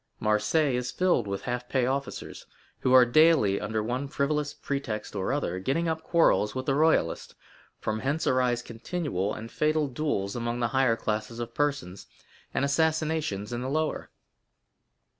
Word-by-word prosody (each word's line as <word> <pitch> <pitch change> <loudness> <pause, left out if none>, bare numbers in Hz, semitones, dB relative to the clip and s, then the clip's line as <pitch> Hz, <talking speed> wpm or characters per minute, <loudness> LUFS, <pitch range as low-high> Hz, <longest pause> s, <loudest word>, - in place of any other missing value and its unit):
Marseilles 110 +6 +2
is 125 - -3
filled 180 - +1
with 100 0 -4
half 125 0 -4
pay 130 -2 +1
officers, 135 +1 -4 0.3
who 130 - 0
are 130 -1 +8
daily, 130 -7 +4
under 110 +1 -2
one 125 +5 -2
frivolous 145 +1 -1
pretext 120 -9 -4
or 95 +3 -1
other, 115 -11 -1
getting 140 - 0
up 160 0 -1
quarrels 165 -11 +2
with 130 0 -3
the 135 - +1
royalists; 155 - +1 0.4
from 110 0 -2
hence 140 +6 -1
arise 125 -2 +2
continual 115 - -3
and 115 +2 -7
fatal 155 -1 +1
duels 125 -8 -2
among 120 0 -2
the 120 -1 +1
higher 130 -3 +3
classes 110 +1 -3
of 120 -1 -5
persons, 135 -11 -2 0.4
and 140 - 0
assassinations 155 -7 0
in 120 - -3
the 130 - -3
lower." 155 +2 -1
130 Hz, 160 wpm, -27 LUFS, 110-150 Hz, 0.4 s, are